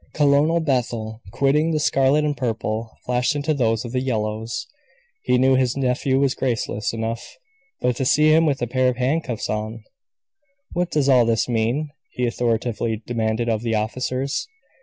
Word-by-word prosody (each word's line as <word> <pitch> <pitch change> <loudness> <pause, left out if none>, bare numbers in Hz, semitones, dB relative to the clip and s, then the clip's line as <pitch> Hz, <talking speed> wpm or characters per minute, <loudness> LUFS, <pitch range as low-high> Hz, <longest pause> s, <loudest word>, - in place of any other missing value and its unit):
Colonel 150 +3 +3
Bethel, 120 -6 -2
quitting 145 +6 +2
the 155 -2 +1
scarlet 140 +1 +3
and 145 -1 0
purple, 115 -3 -2 0.2
flashed 125 +4 +1
into 145 +2 0
those 115 -4 0
of 120 - -6
the 125 0 0
yellows. 110 0 -2 0.6
He 125 - +2
knew 130 +1 +4
his 130 -1 +1
nephew 130 0 +1
was 135 -1 +2
graceless 115 -4 -2
enough; 115 0 -5 0.4
but 125 -1 +1
to 130 - -1
see 150 +4 +4
him 160 +1 +5
with 140 -4 0
a - - 0
pair 130 +2 +1
of 125 - -3
handcuffs 130 -3 -1
on! 110 +1 -4 0.9
"What 180 0 0
does 145 -3 +1
all 125 -3 +5
this 115 -1 +1
mean?" 120 +6 0 0.2
he 125 - -1
authoritatively 115 -2 -1
demanded 115 0 -1
of 110 -2 0
the 115 -1 -1
officers. 130 +5 -2
125 Hz, 165 wpm, -22 LUFS, 115-140 Hz, 0.9 s, him